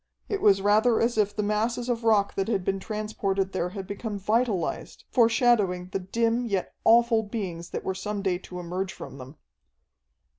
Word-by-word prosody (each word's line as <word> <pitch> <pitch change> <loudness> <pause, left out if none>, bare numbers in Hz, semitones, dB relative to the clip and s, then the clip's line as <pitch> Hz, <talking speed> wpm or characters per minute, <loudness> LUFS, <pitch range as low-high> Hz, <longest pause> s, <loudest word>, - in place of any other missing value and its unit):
It 400 -2 -2
was 195 -1 +4
rather 215 +3 +4
as 235 +1 +1
if 210 -2 +1
the 210 - -1
masses 225 +4 -1
of 240 -2 -1
rock 210 -3 +3
that 195 - -1
had 200 -5 -1
been 195 0 0
transported 200 -2 -2
there 180 -2 -1
had 195 0 -6
become 205 +2 -5
vitalized, 210 -1 -1
foreshadowing 225 -7 +3
the 195 0 -2
dim 230 +5 0
yet 195 -4 -2
awful 230 0 +5
beings 190 -6 -5
that - - -5
were 190 - -1
some 200 +2 -4
day 180 -3 0
to 180 -1 -9
emerge 180 +2 -3
from 135 - -10
them. 130 +4 -10
205 Hz, 180 wpm, -26 LUFS, 190-225 Hz, -, awful